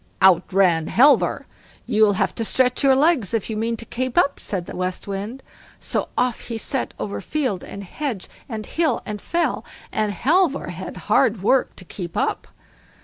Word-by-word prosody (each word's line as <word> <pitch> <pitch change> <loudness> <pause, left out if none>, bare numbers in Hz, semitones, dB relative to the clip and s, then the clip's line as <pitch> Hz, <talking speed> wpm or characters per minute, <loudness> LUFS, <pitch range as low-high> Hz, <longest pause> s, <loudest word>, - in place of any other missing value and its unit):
Out 185 -2 +5
ran 180 -4 +3
Halvor. 280 +4 +4 0.4
"You'll 215 -1 +4
have 185 - 0
to 230 - -3
stretch 250 +2 +2
your 270 -2 +5
legs 270 - +2
if 225 0 -2
you - - -2
mean 230 +2 -1
to 230 - -8
keep 255 +4 -3
up", 285 -5 +3
said 185 -5 -4
the - - -8
West 185 +1 -3
Wind. 205 +7 -5 0.4
So - - -2
off 250 -2 +1
he 230 - -5
set 260 +4 -2
over 200 - -4
field 255 -5 -2
and 200 - -8
hedge, 230 0 -4 0.2
and 220 -3 -5
hill 320 -7 0
and 210 -1 -5
fell, 340 0 -1 0.3
and 215 -1 0
Halvor 305 - +1
had - - -7
hard 220 -7 +2
work 260 +4 +2
to 185 - -12
keep 175 -2 -7
up. - - -1
225 Hz, 180 wpm, -22 LUFS, 195-265 Hz, 0.4 s, Out